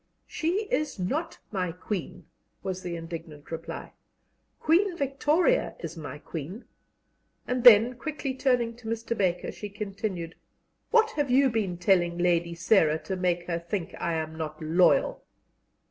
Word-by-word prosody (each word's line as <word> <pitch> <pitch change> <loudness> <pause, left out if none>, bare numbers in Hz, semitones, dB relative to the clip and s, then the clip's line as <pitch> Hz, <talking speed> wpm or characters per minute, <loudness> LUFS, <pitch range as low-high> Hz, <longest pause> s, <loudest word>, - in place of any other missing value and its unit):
"She 350 +6 -1
is 305 -5 0
not 280 - -2
my 185 -4 -1
Queen," 180 -1 -5 0.4
was 190 -1 -3
the 175 -2 -4
indignant 165 -3 -8
reply; 165 0 -6 0.7
"Queen 350 +3 +3
Victoria 295 - +2
is - - -6
my 150 -4 -7
Queen." 165 - -7 0.8
And 250 -1 -1
then, 235 +1 +9
quickly 280 +1 -4
turning 250 -3 +1
to 240 -2 -11
Mr. 230 +1 -2
Baker, 185 -4 0
she 210 - -7
continued: 195 -4 -4 0.6
"What 450 -1 +4
have 290 - -1
you 265 +1 +4
been 200 -6 -1
telling 175 -1 +2
Lady 170 -1 +1
Sarah 165 -2 +3
to 190 - -3
make 175 -1 0
her 170 -1 -2
think 170 +1 -4
I 170 - -1
am 160 0 -3
not 155 -1 -5
loyal?" 165 +3 +3
190 Hz, 145 wpm, -27 LUFS, 170-255 Hz, 0.8 s, then